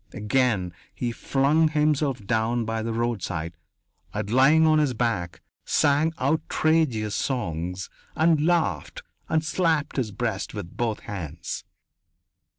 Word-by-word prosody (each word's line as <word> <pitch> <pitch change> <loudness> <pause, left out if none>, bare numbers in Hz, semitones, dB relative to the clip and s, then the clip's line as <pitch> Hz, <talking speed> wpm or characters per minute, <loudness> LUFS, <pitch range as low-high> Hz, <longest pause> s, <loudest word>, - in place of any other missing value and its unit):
Again 105 -4 +1 0.2
he 120 -1 -2
flung 140 +6 +2
himself 150 -6 +1
down 115 +2 0
by 115 0 -2
the 115 +1 -2
roadside 95 -8 -2 0.6
and, 100 - -4
lying 145 +6 +5
on 155 -1 +4
his 140 -5 +1
back, 110 -8 -2 0.2
sang 150 +2 +2
outrageous 140 -5 +1
songs 90 - -2 0.3
and 160 -1 +3
laughed 160 - 0 0.3
and 155 0 +1
slapped 160 -3 0
his 120 -6 -1
breast 100 - -3
with 85 - -7
both 115 -3 -1
hands. 90 -9 -6
120 Hz, 120 wpm, -25 LUFS, 105-155 Hz, 0.6 s, lying